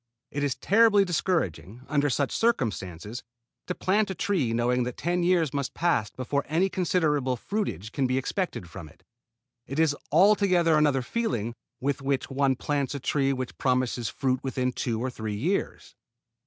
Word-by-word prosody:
It 145 0 -2
is 140 -2 0
terribly 205 -1 +4
discouraging, 140 - -1
under 145 0 +1
such 140 +1 0
circumstances, 110 - -1 0.5
to 180 - -2
plant 205 +2 +1
a 190 - -3
tree 165 - 0
knowing 120 +2 +1
that 125 0 -3
ten 175 +1 0
years 170 -5 +2
must 140 -2 -3
pass 160 -11 +1
before 135 +4 -2
any 170 +6 +2
considerable 150 -8 +1
fruitage 115 - -3
can 135 +2 0
be 130 +1 0
expected 135 - -2
from 85 -3 -9
it. 80 - -22 0.6
It 135 - -5
is 160 -2 +3 0.2
altogether 180 -1 +4
another 145 -4 +3
feeling 125 - -2 0.3
with 140 +1 -1
which 135 0 -1
one 135 0 +2
plants 140 +1 -2
a - - -3
tree 135 +1 +1
which 130 -2 -4
promises 125 -3 0
fruit 130 -2 -1
within 130 -1 -1
two 120 -2 -2
or 130 +2 -2
three 110 -3 -4
years. 170 - -2
140 Hz, 165 wpm, -27 LUFS, 125-175 Hz, 0.6 s, terribly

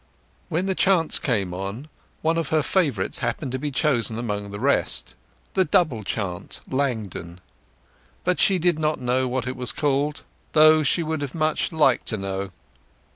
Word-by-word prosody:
When 175 +2 -1
the 195 - 0
chants 185 -4 +2
came 100 -9 -1
on, 100 +9 -5 0.4
one 165 +1 +2
of 165 - -2
her 155 0 +1
favourites 140 - +1
happened 130 - -2
to 130 - -2
be 150 - -2
chosen 125 -6 +1
among 105 -3 -3
the 100 0 -7
rest—the 190 - -1
old 185 - +1
double 155 - +2
chant 95 -3 -4
"Langdon"—but 110 - -5
she 195 - +4
did 175 -2 +2
not 155 0 0
know 130 +1 +1
what 125 0 -2
it 130 0 -3
was 125 -3 0
called, 145 +1 -1 0.3
though 155 0 +7
she 155 +4 +2
would 160 -1 -3
much 155 -1 +1
have 160 - -8
liked 135 -5 +3
to 110 - +2
know. 95 0 -3
135 Hz, 165 wpm, -24 LUFS, 110-155 Hz, 0.4 s, though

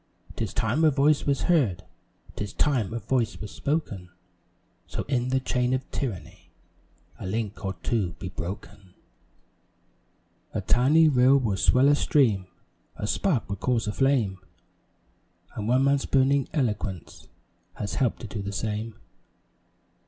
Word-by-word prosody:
'Tis - - -3
time 120 +9 0
a 160 - +7
voice 145 +1 +2
was 140 -1 +1
heard, 120 - +2 0.5
'Tis 105 -2 -5
time 130 -9 +1
a 115 - -3
voice 115 +1 -1
was 105 - -7
spoken 125 - -3 0.8
So - - -4
in 125 -2 -1
the 130 0 +2
chain 125 0 0
of 130 - -5
tyranny 115 -10 -5 0.7
A - - -5
link 110 +1 -3
or 95 -1 -3
two 100 -8 0
be 90 +2 -7
broken. 95 +1 -8 1.6
A - - 0
tiny 150 +6 +4
rill 130 -1 +5
will 115 -7 0
swell 125 +8 +4
a 145 - +6
stream, 115 -10 +2 0.5
A - - -4
spark 135 - 0
will 100 - -4
cause 120 +3 0
a 105 - -1
flame, 120 -9 +1 1.2
And 105 - -4
one 130 +3 +3
man's 140 0 +2
burning 135 +1 +2
eloquence 105 - -3 0.5
Has 100 - -4
help'd 125 -3 0
to 115 - -6
do 100 +1 -5
the 100 0 -4
same. 110 +2 -3
120 Hz, 145 wpm, -26 LUFS, 100-135 Hz, 1.6 s, a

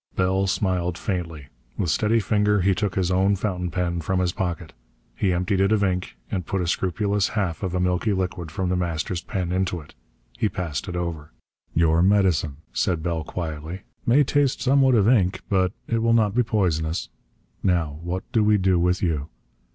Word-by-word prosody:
Bell 95 +1 +1
smiled 90 -3 0
faintly. 80 - -4 0.3
With 85 - 0
steady 110 +2 +2
finger 105 -1 +2
he 95 +2 +3
took 100 -1 -2
his 95 -1 +1
own 95 +2 +3
fountain 90 -3 -2
pen 85 -1 -1
from 95 +3 0
his 90 -1 +1
pocket. 85 -4 -4 0.4
He 95 - +1
emptied 90 +2 0
it 95 +2 +3
of 105 -2 +3
ink, 90 -1 -1
and 95 -3 -1
put 95 +3 -2
a 90 - -1
scrupulous 100 +3 0
half 90 -5 -1
of 95 -2 -2
a - - +1
milky 90 +4 +1
liquid 90 -3 -2
from 90 +3 -2
The 90 - +1
Master's 85 0 -2
pen 90 -4 -3
into 90 -1 0
it. 75 -1 -14 0.5
He 110 - +2
passed 90 -1 -4
it 90 - -4
over. 85 -4 -4 0.4
"Your 80 0 +4
medicine," 90 -7 +2 0.2
said 85 -3 0
Bell 85 -2 -1
quietly, 80 +2 -5 0.2
"may 135 +5 +4
taste 140 -1 +1
somewhat 135 -1 +4
of 105 -2 +4
ink, 100 -7 +3
but 95 -2 +2 0.2
it 115 - 0
will 115 +1 +2
not 110 -3 +3
be 125 - +3
poisonous. 85 -8 0 0.5
Now, 80 -5 0
what 90 +2 -3
do 110 - +3
we 105 0 +4
do 95 -2 +2
with 90 +2 +1
you? 75 -4 -1
90 Hz, 190 wpm, -24 LUFS, 85-100 Hz, 0.5 s, Your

